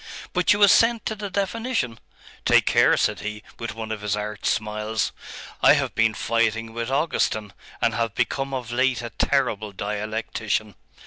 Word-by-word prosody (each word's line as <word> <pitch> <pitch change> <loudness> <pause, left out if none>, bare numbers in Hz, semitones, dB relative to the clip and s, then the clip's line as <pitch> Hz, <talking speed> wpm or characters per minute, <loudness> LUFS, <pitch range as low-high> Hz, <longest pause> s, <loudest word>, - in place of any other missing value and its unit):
But - - +3
you 205 -1 +4
assent 230 +3 +5
to 220 - -2
the 205 -1 -5
definition? 200 - -2 0.4
Take - - +4
care!' - - +4
said - - +1
he, 105 0 -6 0.2
with 115 0 -5
one 110 -1 -5
of 110 -2 -4
his 105 -1 0
arch 105 0 -4
smiles, 105 0 -1 0.5
'I - - +7
have - - 0
been 115 -1 +2
fighting 115 0 0
with 115 +1 -3
Augustine, 130 - 0 0.3
and - - +3
have 115 -3 -1
become 135 -1 -1
of 125 -3 -4
late 130 0 +1
a 120 - -6
terrible 110 -6 0
dialectician. 105 +1 -3
115 Hz, 165 wpm, -24 LUFS, 105-135 Hz, 0.5 s, I